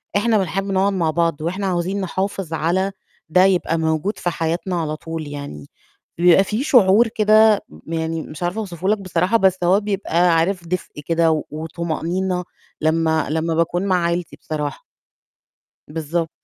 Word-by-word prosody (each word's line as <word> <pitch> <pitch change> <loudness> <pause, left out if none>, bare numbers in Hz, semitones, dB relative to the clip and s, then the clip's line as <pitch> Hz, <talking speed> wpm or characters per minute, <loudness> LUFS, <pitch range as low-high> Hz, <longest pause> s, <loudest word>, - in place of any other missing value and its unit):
إحنا 220 +2 +3
بنحب 195 0 -1
نقعد 195 +1 +2
مع 170 -4 0
بعض، 165 -2 0
وإحنا 190 +5 -2
عاوزين 185 +2 -1
نحافظ 190 -2 -3
على 175 +5 0 0.4
ده 180 +3 +5
يبقى 180 -3 +1
موجود 160 +5 -1
في 175 - -1
حياتنا 170 +2 -2
على 155 -1 -2
طول 160 0 -6
يعني 140 - -8 0.5
بيبقى 175 +2 +6
في 215 +6 -2
شعور 225 -4 +5
كده، 215 -1 +4 0.2
يعني 160 0 -2
مش 155 +2 -8
عارفة 175 +5 -1
أوصفه 185 -4 -5
لك 215 - +3
بصراحة، 190 +2 +1
بس 190 -3 +3
هو 185 +3 +4
بيبقى 185 -4 +1
عارف 175 +1 0
دفء 175 -4 -4
كده، 165 0 +2
و 155 -1 0
وطُمأنينة، 170 +3 -2 0.4
لمَّا 160 0 +1
لمَّا 160 +1 -1
باكون 170 +3 0
مع 180 -3 +2
عيلتي 170 0 -2
بصراحة. 150 -2 -5 1.0
بالضب 160 +2 -2
175 Hz, 155 wpm, -20 LUFS, 160-195 Hz, 1.0 s, بيبقى